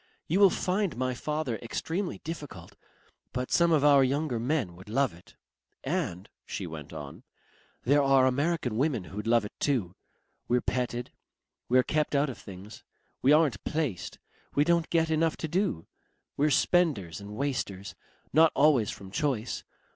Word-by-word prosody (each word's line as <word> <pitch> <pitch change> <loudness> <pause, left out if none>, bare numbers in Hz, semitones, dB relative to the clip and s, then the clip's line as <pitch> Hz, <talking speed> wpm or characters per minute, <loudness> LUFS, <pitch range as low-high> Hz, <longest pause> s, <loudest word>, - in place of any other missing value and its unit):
You 180 +5 +1
will 200 -1 +8
find 185 - -1
my 130 0 0
father 150 -2 -2
extremely 165 - -3
difficult, 145 - -8 0.6
but 125 0 -3
some 170 -1 +4
of 150 -3 +3
our 140 -2 +6
younger 135 -1 0
men 120 - -1
would 95 +3 -13
love 135 +1 +1
it. 85 +2 -18 0.5
"And," 135 - -2 0.2
she 95 - -5
went 80 -4 -8
on; - - -8 0.6
"there 145 +4 +4
are 135 -1 +5
American 135 -2 0
women 130 -6 +1
who'd 105 +4 -7
love 115 -2 +3
it 105 - -8
too. 115 -12 0 0.5
We're 125 +1 +3
petted. 125 0 -2 0.6
We're 130 +1 +5
kept 150 +1 0
out 140 0 +2
of - - -11
things. 100 +2 -11 0.4
We 135 - +4
aren't 150 -9 +3
placed. 150 - -3 0.4
We 145 - +5
don't 170 +1 +2
get 165 -1 +2
enough 160 0 +1
to 160 - -3
do. 170 - -1 0.5
We're 150 +2 +2
spenders 140 - +2
and 100 +1 -8
wasters 105 -8 -3 0.4
not 160 +2 +6
always 140 -7 +4
from 95 -1 -8
choice. 125 -2 -1
135 Hz, 155 wpm, -28 LUFS, 110-155 Hz, 0.6 s, will